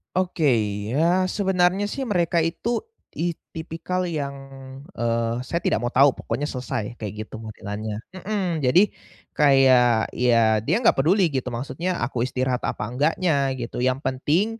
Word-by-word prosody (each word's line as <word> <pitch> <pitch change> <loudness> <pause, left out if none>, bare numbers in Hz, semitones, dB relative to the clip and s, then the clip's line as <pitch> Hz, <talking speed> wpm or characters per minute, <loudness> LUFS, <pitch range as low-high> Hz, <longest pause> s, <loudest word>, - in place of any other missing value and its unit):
Oke, 180 -4 0 0.5
ya 175 +5 +3
sebenarnya 190 0 +1
sih, 270 +3 -3
mereka 175 -5 +1
itu 165 +9 0 0.3
it 170 0 -2 0.2
tipikal 165 +3 -3
yang, 150 -5 -2 0.6
eee, 115 0 -1
"Saya 155 +6 -2
tidak 115 -9 0
mau 120 - -1
tahu 135 +2 +5
pokoknya 145 - -3
selesai," 125 -5 -4
kayak 110 -1 -6
gitu, - - -15
modelannya, 105 0 -5 0.2
mhm. 185 -6 -2
Jadi, 175 +11 +4 0.4
kayak, 130 -5 +4
ya, 115 -3 +3
dia 115 - +1
nggak - - +5
peduli, 165 +3 +2
gitu, 130 -1 -1
maksudnya, 135 +9 -3
aku 120 - -2
istirahat 130 0 -1
apa - - -3
enggaknya, 140 - 0
gitu. 120 0 -4
Yang 130 +1 +1
penting, 145 +9 +1
140 Hz, 145 wpm, -23 LUFS, 120-175 Hz, 0.6 s, tahu